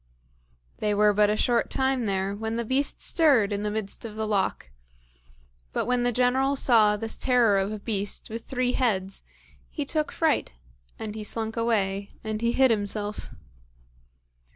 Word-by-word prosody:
They 210 -1 0
were 210 0 +4
but 210 0 +3
a 210 - +1
short 235 +1 +1
time 265 -2 0
there 195 -1 -1
when 220 +2 -3
the 235 0 -2
beast 270 +4 0
stirred 260 - +3
in 200 - -2
the 210 - -1
midst 210 -1 -4
of 220 -2 -7
the 220 0 -2
loch; 195 - -1 1.0
but - - -1
when 250 0 +1
the 245 0 +1
General 255 +3 +2
saw 220 -6 +4
this 225 +1 -4
terror 235 -6 +3
of 195 +2 -1
a 215 - -4
beast 205 -2 -3
with 225 +1 -6
three 250 -1 0
heads, 195 -7 -1 0.5
he 295 - -4
took 305 +1 -1
fright, 320 - 0 0.4
and 215 -1 -5
he 215 0 -6
slunk 220 +1 -4
away, 200 -4 0
and 215 0 -3
he 235 0 +2
hid 260 -2 +4
himself. 205 -1 -3
220 Hz, 170 wpm, -26 LUFS, 205-245 Hz, 1.0 s, were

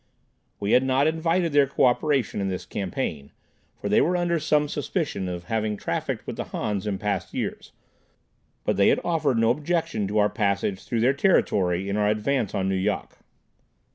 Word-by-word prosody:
We 100 +1 -1
had 125 - +6
not 130 +1 +2
invited 165 +1 +1
their 145 -1 +5
cooperation 130 -2 +1
in 100 - -1
this 90 -1 -4
campaign, 90 - -4 0.5
for - - -4
they 105 - +4
were 180 +2 +2
under 170 -1 +1
some 150 -1 +2
suspicion 145 - -2
of 90 -1 -5
having 110 +1 -1
trafficked - - -3
with - - -6
the - - -3
Hans 105 -1 -3
in 100 -2 -1
past 100 -2 -3
years, - - -4 0.9
but - - 0
they 100 - +5
had - - +4
offered 155 -7 +1
no 115 0 +4
objection 150 - -1
to 105 +2 -2
our 105 0 +5
passage 100 -2 -1
through 115 -2 -1
their 130 +4 +4
territory 95 - +2
in 100 +1 -1
our 105 -1 +2
advance 110 +2 0
on 95 -1 0
Nu 95 - 0
Yok. 95 0 -2
115 Hz, 180 wpm, -25 LUFS, 100-145 Hz, 0.9 s, had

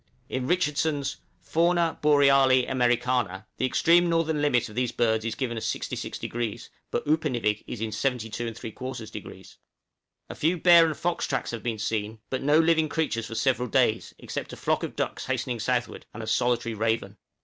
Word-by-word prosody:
In 130 -1 -2
Richardson's 150 -5 0 0.2
'Fauna 170 0 +1
Boreali 135 -3 +5
Americana' 120 -6 0
the 130 - +1
extreme 170 +6 +4
northern 160 -2 +1
limit 135 -5 +2
of 110 - -12
these 125 +1 -1
birds 110 -2 +1
is 115 - -2
given 120 -4 -3
as 110 - -4
66°; 120 -3 -4 0.2
but - - -2
Upernivik 125 -9 0
is 115 - -6
in 110 -1 -2
72 120 -3 -2
3/4°. 115 -1 -7
{"HARNESS 125 -4 -6
JACK."} - - -10 0.7
A - - -7
few 165 +4 +1
bear 170 -1 +7
and 155 - -3
fox 175 0 -1
tracks 135 -5 -2
have 115 -2 -5
been 115 -2 -2
seen, 110 0 -2
but 130 - -1
no 145 +2 +4
living 160 -1 +3
creatures 130 -8 -1
for 115 - -7
several 125 0 +1
days, 120 -4 +1
except - - -6
a - - -8
flock - - 0
of - - -5
ducks - - -3
hastening 120 -2 -2
southward, 120 +2 -2
and 115 - -6
a - - -5
solitary 120 +1 0
raven. 110 -2 -1
125 Hz, 175 wpm, -26 LUFS, 115-150 Hz, 0.7 s, bear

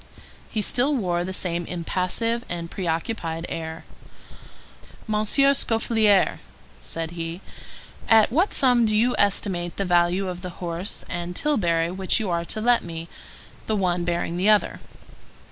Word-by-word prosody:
He 215 -2 -2
still 270 +8 +3
wore 175 -7 0
the 185 - -4
same 175 -2 -1
impassive 185 +7 -1
and 170 -1 -5
preoccupied 165 -1 -3
air. 160 0 -6 1.2
"Monsieur 215 +6 +3
Scaufflaire," 225 -5 +2 0.4
said 165 0 -5
he, 165 0 -5 0.7
"at 225 -1 +6
what 345 - +2
sum 245 -3 +3
do 215 0 +2
you 245 +3 +3
estimate 185 -3 0
the 195 - -1
value 175 +2 +2
of 180 -1 -5
the 180 - -5
horse 175 +2 -3
and 175 0 -5
tilbury 170 - +1
which 190 0 0
you 210 -5 -2
are 170 0 -1
to 215 - -2
let 240 +2 +4
to - - -10
me,—the 165 +5 -8
one 180 -3 0
bearing 170 0 -2
the 190 +4 +2
other?" 210 -1 +3
185 Hz, 145 wpm, -24 LUFS, 170-220 Hz, 1.2 s, at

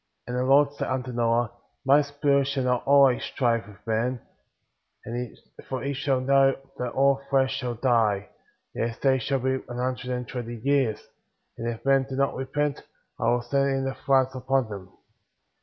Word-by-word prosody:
9 125 - -3
And - - -1
the 130 +1 0
Lord 145 +1 +5
said - - -4
unto 130 -1 -2
Noah: 120 0 +1 0.3
My 140 +2 +6
Spirit^ 140 -1 +1
shall 140 -2 -1
not 125 +1 0
always 140 -3 +5
strive 115 -4 0
with 105 -1 -16
man,* 115 +3 0 1.5
for 130 -2 -3
he 140 +1 -1
shall 135 -1 0
know 135 +1 +4 0.2
tliat 125 -1 -3
all 140 0 +3
flesh 135 -1 +2
shall 125 -3 -3
die; 110 -5 +1 0.4
yet 115 - -1
his 115 - -7
days 130 -2 +2
shall 135 +4 0
be 130 +1 0
an 120 - -6
hun 130 +1 0
dred 125 0 -4
and 125 -1 -6
twenty 120 -2 -5
years; 135 -6 +1 0.5
and 115 - -3
if 115 +1 -7
men 135 -1 +3
do 135 - -4
not 140 +1 +1
repent," 145 +2 -2 0.4
I - - -1
will 120 0 +1
send 140 +3 +1
in 135 0 0
the 135 - -1
floods^ 130 -1 +1
upon 130 -2 0
them. 100 -3 -8
130 Hz, 190 wpm, -26 LUFS, 120-135 Hz, 1.5 s, My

